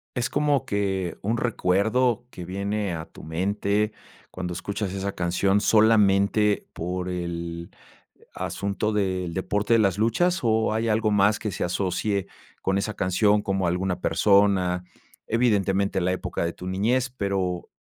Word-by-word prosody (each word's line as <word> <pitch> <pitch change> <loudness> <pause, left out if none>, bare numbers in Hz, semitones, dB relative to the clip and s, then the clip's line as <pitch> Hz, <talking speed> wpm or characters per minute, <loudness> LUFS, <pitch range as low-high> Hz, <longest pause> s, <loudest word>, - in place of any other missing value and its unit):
¿Es 120 -1 -1
como 145 -3 +1
que 95 -4 -1
un 110 +4 0
recuerdo 115 +2 +1
que 90 - -8
viene 100 +1 -2
a 80 - -5
tu - - -14
mente 100 +5 0 0.4
cuando 90 -1 -5
escuchas 100 +2 -4
esa 100 0 -3
canción, 95 +3 +1
solamente 105 -1 +3
por 90 +2 -4
el 85 -1 -4 0.6
asunto 100 +2 -2
del 95 -4 -1
deporte 105 +4 0
de - - +5
las 100 -1 +2
luchas, 175 +12 +2
o 110 -1 +2
hay 115 +1 0
algo 110 0 +2
más 105 +1 +3
que 105 - -3
se - - -2
asocie 95 +2 -1 0.4
con 95 +1 +1
esa 105 +1 -2
canción 105 +3 +2
como 95 -2 -1
alguna 90 +1 -1
persona? 95 -4 +3 0.4
Evidentemente, 100 -4 +1
la 90 +1 +1
época 95 - -3
de 85 - -1
tu 90 - -10
niñez, 120 +7 0
pero, 95 -3 -2
100 Hz, 145 wpm, -25 LUFS, 90-105 Hz, 0.6 s, de